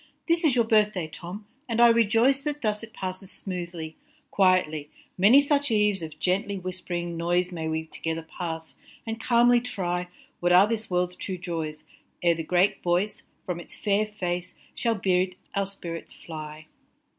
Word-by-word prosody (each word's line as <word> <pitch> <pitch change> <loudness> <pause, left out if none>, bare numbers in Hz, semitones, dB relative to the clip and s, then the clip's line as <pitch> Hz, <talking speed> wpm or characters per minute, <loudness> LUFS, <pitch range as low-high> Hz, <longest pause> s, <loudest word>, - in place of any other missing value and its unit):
This 335 0 +2
is 295 -6 +4
your 235 -2 +4
birth 215 -1 +4
day 180 -3 -1
Tom, 180 +6 -8 0.2
and 230 0 0
I 240 - +9
rejoice 230 +4 +4
That 295 -1 -4
thus 210 -1 0
it 230 -1 -9
passes 185 -2 -5
smoothly, 175 -5 -5 0.3
quietly. 180 -6 +2 0.3
Many 210 +9 +7
such 285 0 +1
eves 210 -4 +2
of 155 -2 -7
gently 200 +3 0
whisp'ring 180 -2 -4
noise 175 +2 +1
May 165 -2 -4
we 160 0 -1
together 160 0 -4
pass, 160 -1 -6 0.3
and 225 0 -4
calmly 240 0 +5
try 180 -7 -2 0.3
What 175 0 +3
are 185 +2 +8
this 225 0 -2
world 180 0 +1
s - - -11
true 190 -2 -4
joys, 160 -4 -4 0.4
ere 170 -1 +5
the 165 - -4
great 180 +4 +2
voice, 180 +4 0 0.2
From 180 -2 -3
its 175 - -11
fair 210 0 +1
face, 180 -3 -4 0.2
shall 230 -2 0
bid 185 -2 +1 0.2
our 200 -1 0
spirits 170 -4 -7
fly. 155 -1 -8
185 Hz, 170 wpm, -26 LUFS, 170-215 Hz, 0.4 s, I